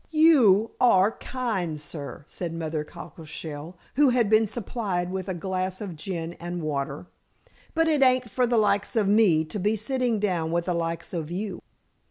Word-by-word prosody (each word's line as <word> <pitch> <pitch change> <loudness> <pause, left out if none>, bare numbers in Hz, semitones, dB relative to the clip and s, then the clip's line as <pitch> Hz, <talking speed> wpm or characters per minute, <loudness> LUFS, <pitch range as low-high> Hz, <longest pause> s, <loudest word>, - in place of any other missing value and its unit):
"You 260 - +5
are 205 -4 +5
kind, 210 -13 -3
sir," 145 -1 -7
said 170 -2 -5
Mother 160 -2 -2
Cockleshell, 155 +1 -8 0.2
who 290 -2 +6
had 240 -4 +2
been 220 0 +5
supplied 200 -5 -3
with 190 0 -4
a 185 - -2
glass 185 +1 -2
of 195 -5 -6
gin 165 +1 -4
and 175 0 -5
water. 140 0 -3 0.7
"But 325 0 +3
it 305 -3 +2
ain't 255 -2 +4
for 245 +3 +1
the 235 0 +2
likes 205 -1 +2
of 215 -3 +2
me 195 -7 +4
to 205 +7 -5
be 210 +4 +1
sitting 245 +1 0
down 175 -6 0
with 170 0 0
the 180 - 0
likes 165 +1 -3
of 160 -3 -3
you." 190 +1 -4
190 Hz, 175 wpm, -26 LUFS, 165-225 Hz, 0.7 s, who